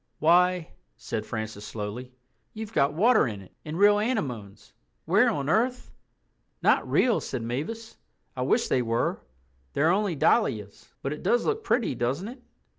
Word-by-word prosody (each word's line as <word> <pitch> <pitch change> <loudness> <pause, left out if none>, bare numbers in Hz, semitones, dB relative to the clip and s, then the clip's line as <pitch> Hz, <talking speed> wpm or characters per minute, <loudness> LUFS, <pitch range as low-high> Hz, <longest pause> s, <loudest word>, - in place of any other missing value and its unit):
"Why," 175 +1 +3 0.3
said - - -5
Francis 110 -2 -5
slowly, 110 +4 -6 0.4
"you've 220 0 -7
got 140 -3 +2
water 225 - +4
in 105 -3 -5
it—and 150 - -9
real 205 +1 +5
anemones! 125 - -3 0.3
Where 205 +9 +4
on 140 -11 -2
earth...?" 245 +9 0 0.7
"Not - - +3
real," 245 -4 +3
said 130 -4 -4
Mavis. 160 - -5 0.4
"I 130 - -4
wish 225 - +2
they 130 - +2
were; 115 0 -1 0.5
they're 155 +4 +3
only 195 -2 +1
dahlias. 105 -7 0
But 135 - -1
it 150 - -8
does 240 - +2
look 445 0 -1
pretty, 230 - +1
doesn't 130 - -2
it?" 250 +1 -11
160 Hz, 150 wpm, -27 LUFS, -, 0.7 s, real